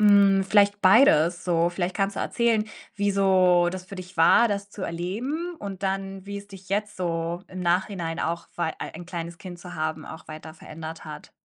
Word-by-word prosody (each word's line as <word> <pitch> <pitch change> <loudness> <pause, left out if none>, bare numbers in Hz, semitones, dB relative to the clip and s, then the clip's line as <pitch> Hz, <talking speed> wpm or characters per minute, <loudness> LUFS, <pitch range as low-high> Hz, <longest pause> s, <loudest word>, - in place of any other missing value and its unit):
Hm, 200 -2 +6
vielleicht 205 +1 +3
beides 180 - +5
so. 170 -1 +2
Vielleicht 175 +1 -3
kannst 195 0 -1
du - - -1
erzählen, 230 -3 +1 0.3
wie 205 0 +1
so 185 -3 +4
das 185 0 -6
für 195 +2 -10
dich 185 0 -10
war, 200 +8 +6
das 200 -1 -3
zu 205 - -11
erleben 240 - -3
und 200 -1 -7
dann, 195 0 -3
wie 200 0 -5
es 200 0 -12
dich 195 -1 -13
jetzt 210 +1 -1
so 170 0 -2
im 185 - -7
Nachhinein 175 -1 -1
auch 170 +1 -2
war 165 -2 -1
ein 175 +2 -7
kleines 170 -1 -6
Kind 180 -1 -9
zu 180 0 -10
haben, 155 -1 -3
auch 160 - -10
weiter 155 0 -9
verändert 160 0 -9
hat. - - -9
185 Hz, 195 wpm, -25 LUFS, 170-200 Hz, 0.3 s, Hm